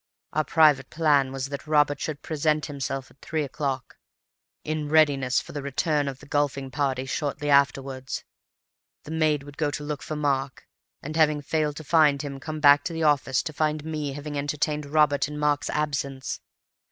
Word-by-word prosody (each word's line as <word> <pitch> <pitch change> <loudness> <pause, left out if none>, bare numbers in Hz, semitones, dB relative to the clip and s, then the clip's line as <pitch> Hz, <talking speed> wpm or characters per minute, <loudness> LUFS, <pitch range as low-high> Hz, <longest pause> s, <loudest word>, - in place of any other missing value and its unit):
Our 155 - +2
private 150 -5 +4
plan 145 -5 +2
was 135 0 -4
that 140 +1 -6
Robert 145 -2 +3
should 150 -2 -4
present 155 -1 0
himself 135 -2 -4
at - - -25
three 155 -1 -2
o'clock, 135 -2 -4 0.7
in 155 -1 -3
readiness 140 -5 +4
for - - -9
the 145 - -4
return 145 +1 0
of 135 -2 -4
the - - -15
golfing 140 -2 -1
party 135 -2 -1
shortly 145 +2 -2
afterwards. 135 -1 +1 0.8
The 155 - -9
maid 155 -3 +1
would 145 0 -12
go 150 -2 +1
to 145 0 -5
look 145 -1 -4
for 155 - -5
Mark, 140 -3 -1 0.4
and 155 +3 -5
having 150 -2 +3
failed 150 0 0
to 155 - -7
find 150 -2 +4
him, 140 -2 -6
come 155 +2 -5
back 145 -1 +6
to 170 - -3
the 165 0 -2
office 140 -3 +2
to 155 - -5
find 155 0 -1
me 150 -3 -3
entertaining 145 0 -2
Robert 150 -2 +3
in 150 0 -7
Mark's 150 -1 +1
absence. 140 -3 -2
145 Hz, 175 wpm, -26 LUFS, 140-155 Hz, 0.8 s, back